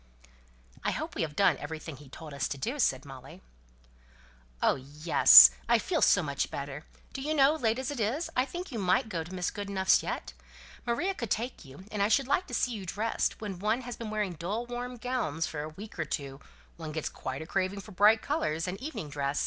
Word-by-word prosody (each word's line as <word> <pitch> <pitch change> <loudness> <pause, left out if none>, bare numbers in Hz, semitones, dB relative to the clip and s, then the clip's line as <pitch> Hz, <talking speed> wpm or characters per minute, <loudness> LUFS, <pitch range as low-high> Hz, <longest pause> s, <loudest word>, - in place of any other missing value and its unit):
'" - - -31 0.3
"I - - +1
hope - - -4
we - - -3
have 155 -3 -3
done 180 -6 +4
everything 155 0 -7
he 145 -2 -14
told 155 +1 -10
us 140 -2 -1
to 140 - -5
do," 240 - -3
said 135 - +1
Molly. 135 +6 -12 1.2
"Oh - - +3
yes! 135 - +8 0.2
I - - +6
feel - - -1
so - - +5
much - - -2
better. 140 +2 -6 0.3
Do 270 - -5
you 305 +3 -1
know, 280 0 +5
late 235 -7 0
as 260 +1 -3
it 285 - -5
is, 250 +11 0
I 255 - +3
think 350 +4 -7
you 230 - -4
might 205 +6 +2
go 170 -5 -3
to 165 - -12
Mrs. 180 -2 -2
Goodenough's 200 -2 +2
yet? - - -5 0.5
Maria 345 +12 0
could 235 - -5
take 235 +6 -2
you, 140 +7 -13
and 210 - -2
I 200 - +4
should 255 +5 +2
like 320 +7 +1
to 245 - -4
see 250 - +1
you 210 -4 -5
dressed; 210 +5 -1
when 200 -4 -5
one 215 +5 0
has 245 -1 -6
been 230 -2 -6
wearing 210 -4 -2
dull 195 +8 -3
warm 245 +1 -5
gowns 230 - -2
for 150 - -5
a 155 - -5
week 195 +4 -11
or 165 - 0
two 140 -2 -4 0.4
one 160 -2 -6
gets 155 0 -3
quite 135 +3 -5
a - - -10
craving 195 +3 -1
for 210 - -13
bright 210 +4 +4
colours, 185 - -1
and 190 +5 -5
evening 280 - -5
dress. 140 0 -2
195 Hz, 225 wpm, -29 LUFS, 150-240 Hz, 1.2 s, yes